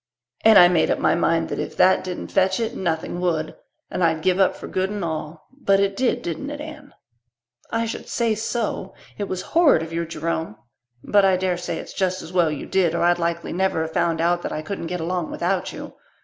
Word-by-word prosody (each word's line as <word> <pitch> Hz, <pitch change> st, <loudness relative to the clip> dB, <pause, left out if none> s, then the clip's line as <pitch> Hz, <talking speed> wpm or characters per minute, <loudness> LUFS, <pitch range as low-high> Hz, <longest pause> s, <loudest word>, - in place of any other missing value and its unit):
And 220 Hz, -1 st, +8 dB
I 175 Hz, -, +9 dB
made 175 Hz, -3 st, +2 dB
up -, -, +2 dB
my -, -, +2 dB
mind 165 Hz, -1 st, +1 dB
that -, -, -3 dB
if -, -, -5 dB
that 185 Hz, -, +4 dB
didn't 180 Hz, -1 st, -6 dB
fetch 190 Hz, +1 st, +2 dB
it 225 Hz, -1 st, -2 dB
nothing 170 Hz, -1 st, -2 dB
would 160 Hz, -3 st, -1 dB, 0.4 s
and 180 Hz, -, -1 dB
I'd 160 Hz, -1 st, +1 dB
give 185 Hz, 0 st, +2 dB
up 190 Hz, -1 st, +3 dB
for -, -, -9 dB
good 190 Hz, 0 st, -1 dB
and 205 Hz, -3 st, -3 dB
all. 155 Hz, -1 st, -5 dB
But 195 Hz, -8 st, +2 dB
it 200 Hz, 0 st, +1 dB
did, 255 Hz, +2 st, 0 dB
didn't 175 Hz, -, -4 dB
it, 295 Hz, 0 st, -6 dB
Anne?" 305 Hz, 0 st, -10 dB, 0.7 s
"I 230 Hz, 0 st, 0 dB
should 225 Hz, -, -6 dB
say 230 Hz, -2 st, +1 dB
so. 220 Hz, -3 st, -3 dB, 0.2 s
It 205 Hz, -, -1 dB
was 185 Hz, -1 st, -4 dB
horrid 320 Hz, -, +5 dB
of 165 Hz, 0 st, -8 dB
you, 170 Hz, 0 st, -2 dB
Jerome 160 Hz, -5 st, -3 dB, 0.5 s
but 205 Hz, -1 st, +3 dB
I 190 Hz, -1 st, +4 dB
daresay 180 Hz, -1 st, -2 dB
it's -, -, -8 dB
just 185 Hz, -1 st, -1 dB
as 170 Hz, -, -10 dB
well 175 Hz, -3 st, +3 dB
you 150 Hz, -3 st, -4 dB
did 175 Hz, -3 st, +1 dB
or -, -, 0 dB
I'd 175 Hz, 0 st, +3 dB
likely 170 Hz, 0 st, -2 dB
never 185 Hz, -2 st, +1 dB
have 160 Hz, 0 st, -6 dB
found 165 Hz, -1 st, +1 dB
out 175 Hz, +1 st, +2 dB
that -, -, -4 dB
I 155 Hz, -, -4 dB
couldn't 170 Hz, 0 st, -5 dB
get 180 Hz, 0 st, -3 dB
along 175 Hz, 0 st, -2 dB
without -, -, -1 dB
you. -, -, -8 dB
180 Hz, 225 wpm, -23 LUFS, 165-195 Hz, 0.7 s, I